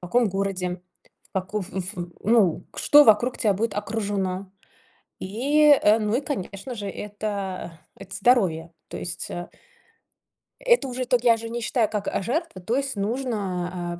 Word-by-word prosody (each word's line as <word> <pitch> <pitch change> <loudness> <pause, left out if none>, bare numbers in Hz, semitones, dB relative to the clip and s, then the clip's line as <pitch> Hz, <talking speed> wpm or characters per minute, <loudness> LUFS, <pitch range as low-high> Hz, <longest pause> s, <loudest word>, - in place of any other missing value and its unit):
В 180 - -7
каком 235 +5 +2
городе? 190 -2 -2 0.5
В - - -56
каков 190 0 -3
эф 190 +1 -3
в 175 -1 -5
ну, 210 -6 +3
к - - -12
что 295 0 +7
вокруг 240 +1 +4
тя 210 - +2
будет 220 +3 -1
окружено? 200 -3 -3 0.7
И, 285 +9 +4
э, 215 +2 +4
ну, 215 +1 +1
и - - 0
конечно 205 -3 -5
же, 205 -3 -5
это 200 -4 -5 0.2
это 195 0 -11
здоровье. 190 -8 +2 0.2
То - - -7
есть, 175 - -5
а 175 0 -5 1.1
Это 485 - +3
уже 255 0 -3
ток 245 -1 +1
я 235 -2 +5
же 230 0 -7
не 235 +1 -4
считаю 230 -1 +1
как, 210 -2 -3
а, - - -1
жертва, 290 - -3
то 225 +7 -1
есть 275 -1 -1
нужно, 190 -6 -3
205 Hz, 165 wpm, -24 LUFS, 185-240 Hz, 1.1 s, что